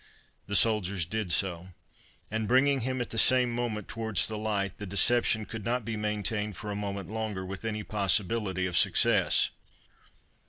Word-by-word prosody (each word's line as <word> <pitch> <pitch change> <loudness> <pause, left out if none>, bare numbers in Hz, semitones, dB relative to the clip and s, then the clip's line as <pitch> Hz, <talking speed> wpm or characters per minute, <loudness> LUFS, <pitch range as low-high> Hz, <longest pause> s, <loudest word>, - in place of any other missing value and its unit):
The 100 - -2
soldiers 100 -4 +2
did 105 +1 -3
so; 90 -1 0 0.6
and 110 0 -2
bringing 135 +3 +3
him 130 +1 -2
at 120 - -5
the 115 - -1
same 125 0 +4
time 115 -3 -2
towards 110 -3 0
the 110 - -4
light, 100 -3 -2
the 105 - -6
deception 110 +3 +2
could 110 0 -7
not 120 +1 -1
be 115 0 -3
maintained 105 -1 -2
for 105 - -6
a - - -3
moment 100 -3 -4
longer 105 -2 -4
with 95 +2 -7
any 110 -1 -3
possibility 100 -1 0
of 90 -1 -3
success. - - +3
105 Hz, 165 wpm, -29 LUFS, 100-115 Hz, 0.6 s, same